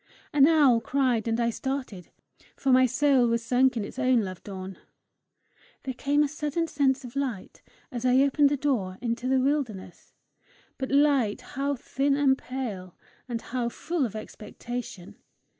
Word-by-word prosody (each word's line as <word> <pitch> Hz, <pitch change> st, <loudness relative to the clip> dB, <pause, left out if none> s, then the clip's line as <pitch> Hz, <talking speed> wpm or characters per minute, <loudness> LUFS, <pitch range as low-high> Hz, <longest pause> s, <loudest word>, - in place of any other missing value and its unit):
An 285 Hz, -1 st, +6 dB
owl 285 Hz, -8 st, +5 dB
cried 250 Hz, -5 st, 0 dB
and 225 Hz, +1 st, 0 dB
I 235 Hz, 0 st, +1 dB
started, 255 Hz, -8 st, -5 dB, 0.5 s
for 270 Hz, -, 0 dB
my 255 Hz, 0 st, +6 dB
soul 265 Hz, -1 st, +3 dB
was 230 Hz, 0 st, 0 dB
sunk 250 Hz, +1 st, +2 dB
in 210 Hz, -, -2 dB
its 260 Hz, -, -9 dB
own 255 Hz, -3 st, +3 dB
love 185 Hz, -3 st, -6 dB
dawn. 190 Hz, -1 st, -8 dB, 1.0 s
There 265 Hz, -, -4 dB
came 285 Hz, +4 st, +1 dB
a -, -, +1 dB
sudden 300 Hz, +3 st, -2 dB
sense 275 Hz, -4 st, 0 dB
of 245 Hz, -, -10 dB
light 255 Hz, -9 st, -4 dB, 0.3 s
as 240 Hz, -2 st, -5 dB
I 255 Hz, +1 st, +4 dB
opened 280 Hz, +1 st, +3 dB
the 290 Hz, -, 0 dB
door 230 Hz, -10 st, -1 dB
into 240 Hz, +1 st, -3 dB
the 265 Hz, 0 st, +3 dB
wilderness, 255 Hz, -10 st, -3 dB, 0.6 s
but 265 Hz, -, -3 dB
light 275 Hz, -6 st, +2 dB
how 280 Hz, +2 st, -1 dB
thin 275 Hz, +2 st, 0 dB
and 275 Hz, -2 st, +4 dB
pale, 220 Hz, -10 st, -6 dB, 0.3 s
and 230 Hz, -1 st, -4 dB
how 240 Hz, -1 st, -2 dB
full 325 Hz, +5 st, -2 dB
of 225 Hz, -4 st, -3 dB
expectation! 215 Hz, -2 st, -8 dB
255 Hz, 160 wpm, -27 LUFS, 230-280 Hz, 1.0 s, An